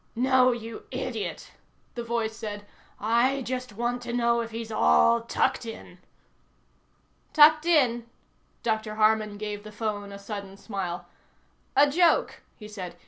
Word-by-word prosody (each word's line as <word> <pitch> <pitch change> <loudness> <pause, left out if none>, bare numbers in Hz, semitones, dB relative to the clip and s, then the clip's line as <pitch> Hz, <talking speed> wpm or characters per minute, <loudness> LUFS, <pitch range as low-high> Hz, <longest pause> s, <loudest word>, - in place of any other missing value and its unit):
"No, 255 +1 +4
you 230 -2 -7
idiot," - - -5 0.4
the 240 - -5
voice 230 -1 -2
said. 205 -2 -6 0.3
"I 240 +5 +2
just 250 -2 -4
want 240 +3 -2
to 240 0 -6
know 235 -1 +2
if 230 - -5
he's 225 0 -6
all 230 +2 +4
tucked 260 +3 0
in." 225 -1 -9 1.3
"Tucked 310 +1 +6
in?" 245 -8 +3 0.6
Dr. 220 -2 -1
Harman 215 -1 +2
gave 210 0 -5
the 215 - -10
phone 205 -2 -4
a 200 - -8
sudden 200 -1 -7
smile. 190 -5 -5 0.7
"A 290 - +6
joke," 335 +3 +2
he 210 - -11
said. 185 -5 -7
230 Hz, 140 wpm, -27 LUFS, 210-245 Hz, 1.3 s, Tucked